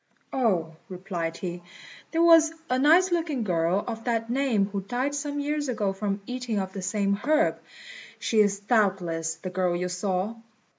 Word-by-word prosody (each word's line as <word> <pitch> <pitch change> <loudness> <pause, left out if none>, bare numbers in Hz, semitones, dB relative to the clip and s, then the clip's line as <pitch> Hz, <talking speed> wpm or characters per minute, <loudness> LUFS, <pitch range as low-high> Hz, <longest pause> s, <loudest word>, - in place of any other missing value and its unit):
"Oh," 185 -11 +1 0.2
replied 175 -3 -4
he, 175 -1 -5 0.5
"there 330 0 +2
was 330 -2 +7 0.2
a 255 - +2
nice 335 +7 +5
looking 320 -8 0
girl 180 0 +1
of 225 -1 -6
that 230 -1 -1
name 250 -6 +2
who 200 0 -4
died 250 +8 -2
some 290 0 -3
years 290 0 -1
ago 205 -5 0
from 200 0 -3
eating 250 -2 -3
of 190 -1 -3
the 195 - -5
same 200 +1 0
herb. 310 +8 +2 0.6
She 220 - 0
is 200 -1 +3
doubtless 185 -7 +1
the 180 +3 -7
girl 180 -1 0
you 180 +1 -2
saw." 190 +4 -2
210 Hz, 165 wpm, -26 LUFS, 185-265 Hz, 0.6 s, was